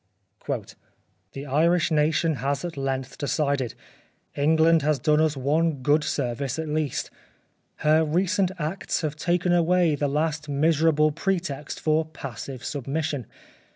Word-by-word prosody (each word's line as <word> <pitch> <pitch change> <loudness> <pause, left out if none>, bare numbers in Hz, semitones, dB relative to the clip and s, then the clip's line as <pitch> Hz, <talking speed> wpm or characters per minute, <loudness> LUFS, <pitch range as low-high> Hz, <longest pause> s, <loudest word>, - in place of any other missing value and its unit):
" 95 +1 -40
The 135 +1 -6
Irish 165 +5 +2
Nation 155 0 +2
has 140 +6 -2
at 175 - -5
length 135 -1 -3
decided. 140 -4 -1 0.6
England 160 +2 +4
has 150 0 +1
done 150 +4 +2
us 155 -2 +1
one 145 +1 0
good 150 +2 +3
service 135 -2 -2
at 160 0 -3
least. 150 -2 -2 0.7
Her 155 +1 +5
recent 185 +4 +1
acts 170 +5 -2
have 155 -2 -2
taken 175 +3 +1
away 175 -1 +3
the 145 0 0
last 150 +1 -1
miser 155 +3 +2
able 155 -1 +4
pretext 165 -3 -3
for 155 +1 +2
passive 135 -4 -8
submission. 145 0 -3
150 Hz, 135 wpm, -25 LUFS, 140-160 Hz, 0.7 s, Her